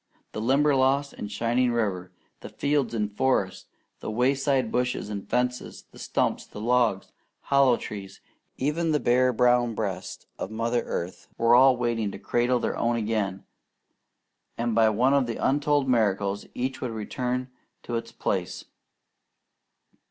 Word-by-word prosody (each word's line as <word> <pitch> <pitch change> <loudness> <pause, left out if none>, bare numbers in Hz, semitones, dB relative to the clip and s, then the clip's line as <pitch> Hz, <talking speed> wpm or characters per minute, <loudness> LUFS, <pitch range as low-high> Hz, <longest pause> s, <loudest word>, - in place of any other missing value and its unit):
The 110 - -5
Limberlost 140 +2 +2
and 105 - -7
shining 120 +4 +1
river, 100 -6 -2 0.3
the - - -9
fields 140 -4 0
and 105 -2 -2
forests, 130 -8 0 0.3
the - - -6
wayside 130 +1 +1
bushes 125 -3 -1
and 100 -2 -6
fences, 125 0 -2
the - - -15
stumps, - - -1
logs, 115 -2 +1 0.3
hollow 135 -3 +3
trees, 100 -2 -8 0.4
even 155 +4 0
the 150 - +2
bare 125 0 +3
brown 120 -1 +2
breast 100 -4 -4
of - - -4
Mother 115 +2 -1
Earth, 85 +2 -5
were 115 +1 +4
all 130 +1 +6
waiting 120 -3 -1
to - - -6
cradle 120 +1 +1
their 120 - -2
own 120 0 0
again; 105 -4 -2 1.1
and 115 0 -1
by 110 0 +4
one 125 +6 +2
of 140 -3 +2
the 115 - -3
untold 145 0 +1
miracles 100 -4 +1
each 130 +2 -3
would 125 - -2
return 125 +3 -3 0.3
to 120 - -6
its 115 0 -4
place. - - -3
120 Hz, 145 wpm, -26 LUFS, 110-130 Hz, 1.1 s, all